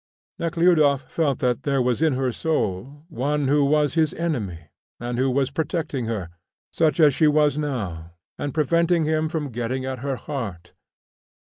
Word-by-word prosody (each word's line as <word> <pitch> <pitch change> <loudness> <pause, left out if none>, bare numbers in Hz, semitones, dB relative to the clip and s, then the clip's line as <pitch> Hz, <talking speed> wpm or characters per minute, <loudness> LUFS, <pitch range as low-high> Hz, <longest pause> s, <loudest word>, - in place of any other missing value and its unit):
Nekhludoff 165 -4 +3
felt 145 -5 +1
that 125 +1 +1
there 140 -1 0
was 125 +2 +1
in 160 -3 +3
her 130 -1 0
soul 140 - -2
one 145 -1 -1
who 145 +1 +3
was 150 0 +2
his 160 -2 +1
enemy 100 - -3 0.3
and 120 0 -3
who 130 +1 +2
was 135 +1 0
protecting 150 -4 -2
her, 100 -7 -4 0.4
such 160 0 +2
as 150 -3 +6
she 155 +3 +3
was 150 -1 +3
now, 100 - -4 0.2
and 145 - -4
preventing 170 +3 +2
him 155 0 0
from 155 -4 -3
getting 120 +3 -3
at 130 -1 -4
her 135 +1 -2
heart. 115 - -6
140 Hz, 165 wpm, -23 LUFS, 125-155 Hz, 0.4 s, as